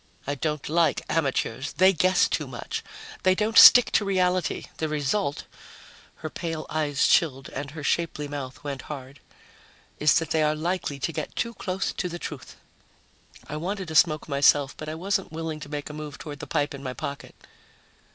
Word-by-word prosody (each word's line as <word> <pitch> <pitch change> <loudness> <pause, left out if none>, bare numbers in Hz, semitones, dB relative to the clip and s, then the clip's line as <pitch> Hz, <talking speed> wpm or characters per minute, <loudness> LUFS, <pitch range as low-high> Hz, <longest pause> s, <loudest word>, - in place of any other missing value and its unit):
I 145 - -1
don't 150 +1 -3
like 165 +2 +2
amateurs. 135 -3 -1
They 190 +2 +5
guess 185 +2 +3
too - - -2
much. - - -5 0.4
They 185 0 +4
don't 215 +3 -1
stick 245 - +10
to - - +3
reality. 185 -3 0
The 155 - -2
result 150 +2 -1 0.4
" - - -22
her - - -2
pale 165 -3 -4
eyes 150 -2 +1
chilled 135 -5 +2
and 140 +1 -5
her 150 +1 -8
shapely 150 -1 -1
mouth 140 -3 -7
went 140 -2 -4
hard 135 -2 -8 0.8
"is 150 -1 +4
that 165 -2 0
they 160 - +2
are 155 0 +2
likely 165 -2 -2
to 150 +5 -3
get 155 -1 -5
too 235 - -2
close 190 -3 -3
to 180 - -3
the 175 - -5
truth." 150 -5 -8 0.9
I 150 - -5
wanted 185 +1 -4
a - - -5
smoke 155 -2 +4
myself, 140 -1 +3
but 155 - -7
I 155 - -4
wasn't 195 +2 -1
willing 160 -1 -4
to 145 - -9
make 145 -1 -5
a 150 - -8
move 150 -1 -7
toward 145 -2 -8
the - - -7
pipe 145 -3 0
in 140 - -8
my 130 -2 -4
jacket. 140 +2 -7
155 Hz, 190 wpm, -26 LUFS, 145-175 Hz, 0.9 s, stick